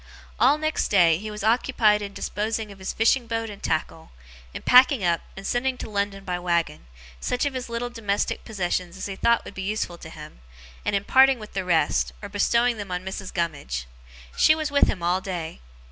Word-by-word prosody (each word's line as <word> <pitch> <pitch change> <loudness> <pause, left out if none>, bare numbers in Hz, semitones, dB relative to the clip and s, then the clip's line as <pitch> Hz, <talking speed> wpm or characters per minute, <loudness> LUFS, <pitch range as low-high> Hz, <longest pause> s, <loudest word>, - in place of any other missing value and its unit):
All 280 +4 +5
next 310 0 -1
day, 170 -5 +4
he 215 +2 -6
was 210 -1 -6
occupied 220 -2 +3
in 200 -1 -5
disposing 215 +1 -3
of 195 - -13
his 190 - -3
fishing 230 +2 +2
boat 225 -1 -2
and 200 - -11
tackle; 160 0 -2 0.4
in - - -8
packing 255 -2 +6
up, 170 -2 +2 0.2
and 195 - -8
sending 255 +3 0
to 225 - -7
London 200 -1 -2
by 180 -2 -3
waggon, 170 - -1 0.3
such 250 - -1
of 285 - -1
his 255 -2 -5
little 235 +1 -3
domestic 205 -4 -2
possessions 180 -4 -3
as 190 - -5
he 195 - -5
thought 235 +4 +2
would - - -9
be 195 - -6
useful 190 -3 -3
to 160 - -10
him; 150 - -11 0.4
and - - 0
in 200 - 0
parting 265 +3 +5
with 215 -2 -11
the 190 - -2
rest, 165 -4 +1
or 205 - -8
bestowing 235 +4 +2
them 205 -2 -6
on 180 +1 -4
Mrs. 190 0 -6
Gummidge. 145 - -3 0.5
She 310 - +5
was 310 -2 -3
with 285 - +4
him 180 - -3
all 180 +2 +1
day. 175 -4 -5
200 Hz, 205 wpm, -24 LUFS, 180-235 Hz, 0.5 s, packing